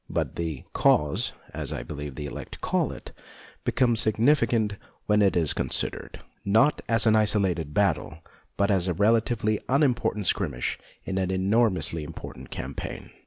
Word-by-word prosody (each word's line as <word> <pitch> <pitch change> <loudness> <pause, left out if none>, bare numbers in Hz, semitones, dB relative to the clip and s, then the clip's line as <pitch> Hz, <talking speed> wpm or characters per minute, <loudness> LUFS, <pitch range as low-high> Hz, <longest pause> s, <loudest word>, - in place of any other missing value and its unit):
But - - -2
the 80 -5 -4
" - - -41
cause," 75 -1 +2 0.2
as - - -4
I - - -4
believe 75 -2 -7
the 75 - -5
elect 70 - -8
call - - 0
it, - - -10 0.5
becomes 120 -3 +2
significant 115 -2 +2 0.3
when 105 0 +3
it 100 -2 +3
is 80 -4 +3
considered, - - -2 0.2
not 110 +9 +3
as 115 -1 +3
an 110 -1 +5
isolated 95 -7 +2
battle, 80 -4 0 0.4
but 100 +1 +2
as 95 -2 +2
a 90 - 0
relatively 110 +1 +2
unim 135 -1 +4
portant 105 -3 -2
skirmish 75 -11 -1 0.2
in 95 0 -2
an 95 -1 -1
enormously 95 -4 +1
important 75 - -9
campaign. - - -6
100 Hz, 155 wpm, -26 LUFS, 85-110 Hz, 0.5 s, an